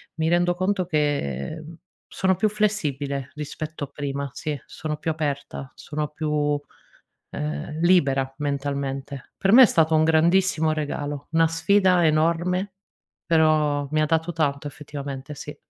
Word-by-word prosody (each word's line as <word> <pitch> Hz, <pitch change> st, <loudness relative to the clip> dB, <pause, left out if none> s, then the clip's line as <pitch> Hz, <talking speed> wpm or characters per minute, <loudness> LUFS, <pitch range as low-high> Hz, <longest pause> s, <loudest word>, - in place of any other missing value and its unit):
mi 160 Hz, 0 st, 0 dB
rendo 175 Hz, +1 st, +3 dB
conto 185 Hz, +1 st, 0 dB
che, 145 Hz, -, -1 dB
mhmm, 165 Hz, +2 st, -10 dB, 0.3 s
sono 190 Hz, -1 st, +1 dB
più 215 Hz, -, +2 dB
flessibile 145 Hz, -10 st, -1 dB
rispetto 150 Hz, 0 st, -5 dB
a -, -, -16 dB
prima, 140 Hz, 0 st, -4 dB
sì 150 Hz, -3 st, -4 dB
sono 155 Hz, -1 st, -5 dB
più 165 Hz, -, -3 dB
aperta, 140 Hz, -3 st, -4 dB
sono 150 Hz, -1 st, -4 dB
più, 155 Hz, 0 st, -4 dB
uhm, 145 Hz, -, -4 dB
libera 140 Hz, -7 st, +3 dB
mentalmente. 140 Hz, -1 st, -3 dB
Per 195 Hz, -, +2 dB
me 260 Hz, -, +10 dB
è -, -, +10 dB
stato 160 Hz, -6 st, +3 dB
un 155 Hz, -, +4 dB
grandissimo 160 Hz, 0 st, +3 dB
regalo. 145 Hz, -1 st, -4 dB
Una 165 Hz, 0 st, +4 dB
sfida 180 Hz, +1 st, +3 dB
enorme, 170 Hz, +5 st, +1 dB, 0.5 s
però 155 Hz, -3 st, +3 dB
ha 140 Hz, -, -7 dB
mi 155 Hz, 0 st, +2 dB
dato 160 Hz, +2 st, 0 dB
tanto 145 Hz, -2 st, -1 dB
effettivamente 140 Hz, -1 st, -7 dB
sì. 150 Hz, +1 st, -8 dB
155 Hz, 140 wpm, -24 LUFS, 145-165 Hz, 0.5 s, me